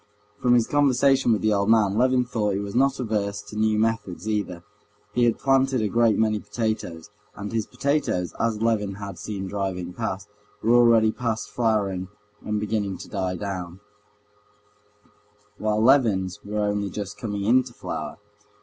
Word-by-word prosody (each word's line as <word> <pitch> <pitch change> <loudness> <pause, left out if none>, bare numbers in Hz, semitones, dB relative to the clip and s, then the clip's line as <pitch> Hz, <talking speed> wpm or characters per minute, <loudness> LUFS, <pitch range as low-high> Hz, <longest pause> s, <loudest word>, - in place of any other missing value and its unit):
From 125 0 +4
his 120 -2 +4
conversation 135 -2 +3
with 110 - +1
the 110 -1 +3
old 100 +1 +1
man, 105 -3 +4
Levin 125 +2 +3
thought 105 -5 -1
he - - -1
was 100 0 -5
not 135 +2 +2
averse 105 -4 -2
to - - -11
new 110 0 +2
methods 110 -3 -1
either. 100 -5 -2 0.5
He 120 +1 +3
had 115 - +2
planted 135 -1 +2
a - - +1
great 115 -1 +3
many 110 -1 +2
potatoes, 105 -5 -4 0.2
and 100 0 -6
his 110 -1 -1
potatoes, 125 - -1
as 115 -1 0
Levin 105 -4 0
had 100 -2 -7
seen 100 -3 -5
driving 95 -2 -3
past, 105 -2 -4 0.4
were 115 +2 +4
already 115 -2 +5
past 115 -2 -3
flowering 100 -6 0 0.4
and 105 0 -1
beginning 105 -2 -2
to - - -10
die 95 -2 -2
down, 90 -2 -5 1.8
while 105 0 0
Levin's 110 -7 +3
were 105 +1 -5
only 105 -1 -1
just 105 +2 -6
coming 105 -2 -3
into 125 +4 +3
flower. - - -6
105 Hz, 160 wpm, -24 LUFS, 100-115 Hz, 1.8 s, already